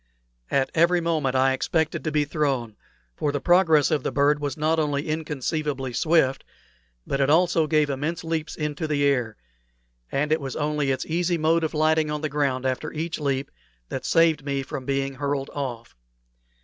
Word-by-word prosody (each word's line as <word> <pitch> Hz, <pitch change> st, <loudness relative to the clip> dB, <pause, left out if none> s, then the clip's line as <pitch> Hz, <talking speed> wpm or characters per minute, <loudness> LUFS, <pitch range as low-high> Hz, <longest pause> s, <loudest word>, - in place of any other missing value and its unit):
Every 170 Hz, +6 st, +2 dB
moment 155 Hz, -6 st, 0 dB
I 130 Hz, 0 st, +3 dB
expected 160 Hz, +4 st, -1 dB
to 155 Hz, -, 0 dB
be 150 Hz, 0 st, +1 dB
thrown, 135 Hz, -8 st, -1 dB, 0.4 s
for 145 Hz, -, -1 dB
the 145 Hz, -, -2 dB
progress 165 Hz, -3 st, +4 dB
of 155 Hz, -3 st, +1 dB
the -, -, -2 dB
bird 145 Hz, +1 st, +2 dB
was 145 Hz, +2 st, -3 dB
not 155 Hz, +2 st, +1 dB
only 145 Hz, -1 st, -1 dB
inconceivably 150 Hz, -3 st, -2 dB
swift, 155 Hz, -3 st, +2 dB, 0.6 s
but 140 Hz, -, -1 dB
it 135 Hz, -, +2 dB
also 165 Hz, 0 st, +3 dB
gave 155 Hz, -1 st, +3 dB
immense 155 Hz, +5 st, -3 dB
leaps 160 Hz, -1 st, -3 dB
into 150 Hz, +1 st, -3 dB
the 145 Hz, -2 st, 0 dB
air; 125 Hz, -6 st, 0 dB, 0.7 s
and 150 Hz, +2 st, 0 dB
it 155 Hz, 0 st, +2 dB
was 135 Hz, -2 st, -5 dB
only 150 Hz, -2 st, -1 dB
its 130 Hz, -, -1 dB
easy 170 Hz, +1 st, 0 dB
mode 165 Hz, +1 st, +2 dB
of 160 Hz, -, -2 dB
lighting 155 Hz, 0 st, +2 dB
on 150 Hz, 0 st, -3 dB
the 155 Hz, -, -2 dB
ground 135 Hz, -3 st, -1 dB
after 130 Hz, +4 st, -2 dB
each 160 Hz, +1 st, -4 dB
leap 140 Hz, -2 st, -2 dB, 0.4 s
that -, -, -4 dB
saved 165 Hz, -3 st, +3 dB
me 140 Hz, -1 st, -2 dB
from 130 Hz, 0 st, -6 dB
being 135 Hz, 0 st, -1 dB
hurled 140 Hz, 0 st, -3 dB
off. 125 Hz, -5 st, -5 dB
150 Hz, 175 wpm, -24 LUFS, 135-160 Hz, 0.7 s, progress